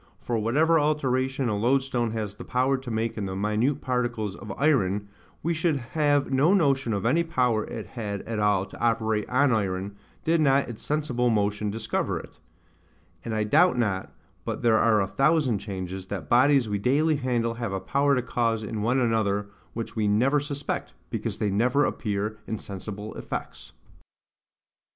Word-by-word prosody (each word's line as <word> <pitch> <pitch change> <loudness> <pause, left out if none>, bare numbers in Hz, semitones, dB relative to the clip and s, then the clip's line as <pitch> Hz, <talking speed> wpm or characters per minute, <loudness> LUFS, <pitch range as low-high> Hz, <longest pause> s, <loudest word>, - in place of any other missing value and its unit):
For 120 - -3
whatever 155 +9 +3
alteration 135 -3 0
a 105 - 0
loadstone 125 +1 +1
has 105 -3 -3
the - - -10
power 130 +2 +1
to 130 -1 -6
make 115 0 -2
in 100 - -2
the 95 - -4
minute 105 +7 0
particles 120 -5 -1
of 105 -2 -8
iron, 105 -9 +2 0.4
we 170 - +1
should 160 -1 +1 0.2
have 145 -2 +2
no 150 +9 +4
notion 135 - +2
of 100 0 -2
any 140 +8 +3
power 125 -9 +1
it - - -6
had 105 -5 -5
at 115 -1 -4
all 100 -2 +2
to - - -13
operate 110 -2 +1
on 130 +2 +3
iron, 100 -2 -1 0.3
did 165 0 +2
not 140 -1 +3
its 120 -3 -8
sensible 130 -5 0
motion 105 -1 0
discover 110 +1 -2
it: 75 - -14 0.8
and 110 - -3
I 110 - +1
doubt 155 +8 +4
not, 100 -6 -1 0.3
but - - -4
there 115 -2 +4
are 110 -3 +4
a 95 - 0
thousand 135 0 +2
changes, 95 -2 -6
that - - -5
bodies 130 0 +4
we 105 -1 -1
daily 145 +7 +2
handle 120 -4 0
have 115 -3 -4
a 95 - -2
power 140 +8 +2
to 125 - 0
cause 115 -3 0
in 105 0 -4
one 120 +5 +1
another, 105 -4 0 0.2
which 115 0 -5
we 110 -2 +1
never 125 +8 +3
suspect, 145 0 -4 0.2
because - - -3
they 105 - 0
never 125 +8 +2
appear 105 -2 -2
in 110 - -2
sensible 105 +2 -7
effects. - - -6
115 Hz, 175 wpm, -26 LUFS, 105-135 Hz, 0.8 s, no